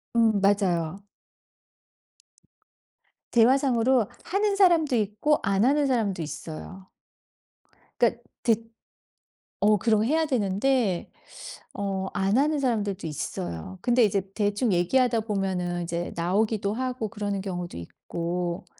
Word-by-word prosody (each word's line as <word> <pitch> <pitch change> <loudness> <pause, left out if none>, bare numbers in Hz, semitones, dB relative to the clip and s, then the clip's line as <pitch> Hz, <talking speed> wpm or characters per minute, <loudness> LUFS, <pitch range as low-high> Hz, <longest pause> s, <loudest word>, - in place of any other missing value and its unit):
음. 220 -3 +4
맞아요. 195 -2 +1 2.3
대화상으로 245 -1 +3 0.2
하는 405 +1 0
사람도 335 -8 +4
있고 215 +8 +1
안 200 +3 +2
하는 285 +1 +3
사람도 210 -9 0
있어요. 160 +5 -8 1.1
그러니까 - - +2 0.2
듣 230 -1 0 0.9
어 210 +1 +4
그런 215 +1 +2
해야 320 +6 +2
되는데 220 - 0 0.7
어 195 -1 -2
안 195 +2 +1
하는 300 +2 +2
사람들도 205 -8 -1
있어요. 85 - -5
근데 245 0 +4
이제 200 -2 +2
대충 205 +1 0
얘기하다 235 +7 +2
보면은 185 -4 -2
이제 170 +1 -3
나오기도 200 +4 0
하고 250 -3 -3
그러는 205 -3 -3
경우도 180 - -5
있고 170 - -4
205 Hz, 250 characters per minute, -26 LUFS, 185-245 Hz, 2.3 s, 음